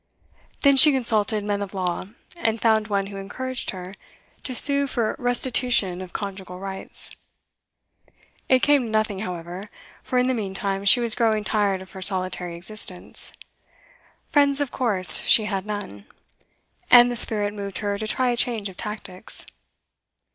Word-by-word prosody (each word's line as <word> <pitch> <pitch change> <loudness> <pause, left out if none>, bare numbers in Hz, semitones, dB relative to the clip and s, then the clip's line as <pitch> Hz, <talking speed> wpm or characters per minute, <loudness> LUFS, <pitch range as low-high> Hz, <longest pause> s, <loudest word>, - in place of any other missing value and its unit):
Then 280 -1 +4
she 300 +3 +10
consulted 220 -5 0
men 205 0 -2
of 200 0 -7
law, 185 -1 -3 0.3
and 225 -10 -2
found 220 -2 +2
one 200 -2 -1
who 200 0 -9
encouraged 255 +6 -5
her 185 0 -7 0.5
to 255 - -3
sue 280 +2 +2
for 235 -4 -2
restitution 245 -6 +1
of 185 -1 -9
conjugal 190 -3 -7
rights. 190 0 -7 1.3
It 255 -1 +3
came 285 -3 +3
to - - -6
nothing, 215 -2 -1
however; 180 +1 -7 0.3
for 255 - -3
in 250 0 +2
the 260 - +1
meantime 195 -2 -3
she 245 - +6
was 235 -2 +3
growing 220 -3 0
tired 200 -3 -1
of 190 - -17
her 190 - -10
solitary 185 -2 -2
existence, 185 0 -8 1.0
friends 285 -1 +3
of 285 -3 -2
course 205 -8 +7
she 215 - +6
had 195 -1 -4
none, 205 - -7 0.8
and 245 0 +7
the - - -3
spirit 205 -3 +1
moved 200 -2 -6
her 205 -1 -3
to 215 - -4
try 255 +3 0
a - - -1
change 230 -4 -1
of 185 - -14
tactics. 210 -2 -6
210 Hz, 155 wpm, -23 LUFS, 190-245 Hz, 1.3 s, she